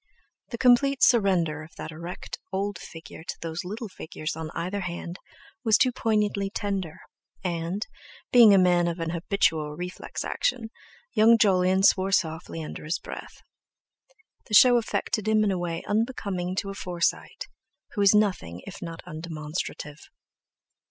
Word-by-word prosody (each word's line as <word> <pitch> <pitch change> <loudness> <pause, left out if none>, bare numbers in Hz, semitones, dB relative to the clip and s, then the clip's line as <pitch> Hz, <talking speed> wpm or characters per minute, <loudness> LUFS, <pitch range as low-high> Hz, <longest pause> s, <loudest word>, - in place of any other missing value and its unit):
The 235 - -5
complete 265 +3 +4
surrender 185 -9 +3
of 155 +1 -13
that - - -7
erect 170 +3 -7
old 195 0 -2
figure 165 -1 -11
to - - -5
those 165 +1 -4
little 215 +5 -5
figures 155 -5 -6
on 160 -1 -5
either 180 +4 -2
hand 175 0 -5 0.4
was 220 -2 +5
too 255 -3 +3
poignantly 210 -4 0
tender, 195 -5 -3 0.4
and, 175 +3 -2 0.5
being 235 -4 +8
a 200 - +7
man 175 -2 +4
of 170 0 -3
an 165 -1 -2
habitual 165 -4 0
reflex 180 +2 -6
action, 240 - -1 0.4
young 225 +1 +6
Jolyon 190 -2 +3
swore 195 -1 +4
softly 160 -2 -1
under - - -7
his 155 +3 -1
breath. - - -10 1.0
The 215 - +1
show 245 +2 +8
affected 215 -2 -1
him 215 0 +4
in 205 - +2
a 185 - -1
way 170 -1 -3
unbecoming 205 -5 -1
to 195 - -6
a - - -6
Forsyte, 175 -3 -2 0.5
who 210 - -2
is 200 +1 +6
nothing 180 - 0
if - - -9
not 165 -1 -7
undemonstrative. 155 -1 -5
185 Hz, 150 wpm, -26 LUFS, 165-210 Hz, 1.0 s, being